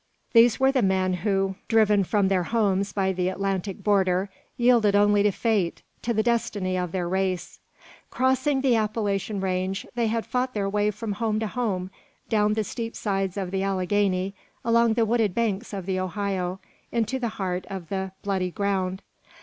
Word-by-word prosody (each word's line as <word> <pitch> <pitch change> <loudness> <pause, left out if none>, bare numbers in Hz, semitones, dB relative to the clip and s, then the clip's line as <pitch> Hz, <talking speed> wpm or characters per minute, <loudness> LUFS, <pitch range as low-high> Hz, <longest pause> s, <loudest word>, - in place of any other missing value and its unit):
These 230 0 +6
were 265 0 +4
the 265 -2 +2
men 190 -2 +2
who, 195 0 0
driven 210 -3 +4
from 200 +1 +1
their 190 -1 +2
homes 200 -1 +1
by 195 -2 0
the 180 0 0
Atlantic 195 0 -3
border, 190 -2 +2 0.3
yielded 235 -4 +4
only 205 0 +4
to 210 - +4
fate 200 -5 0 0.2
to 235 - -1
the 220 -1 +1
destiny 220 -5 0
of 180 -2 -2
their 180 -1 -2
race. 185 0 -2 0.5
Crossing 265 +2 +1
the 260 -3 +3
Appalachian 210 -2 -1
range, 190 +1 -1
they 235 -1 0
had 225 +1 -1
fought 255 0 -1
their 200 -1 0
way 205 +1 +1
from 210 +1 -4
home 215 +1 -1
to 220 - -1
home, 200 -5 -2 0.4
down 210 -2 +3
the 220 0 0
steep 230 +3 -5
sides 195 -2 -2
of 190 -2 -3
the 190 0 -1
Alleghany, 195 0 0 0.3
along 230 -1 +3
the 230 -1 +3
wooded 220 -4 +1
banks 225 -1 -1
of 195 -3 -5
the 190 -1 -1
Ohio, 185 0 -2 0.3
into 235 +2 0
the 240 -2 -1
heart 185 -2 -2
of 190 -5 -6
the 190 -1 -3
"Bloody 190 -2 0
Ground." 190 -1 -1
200 Hz, 175 wpm, -25 LUFS, 190-225 Hz, 0.5 s, These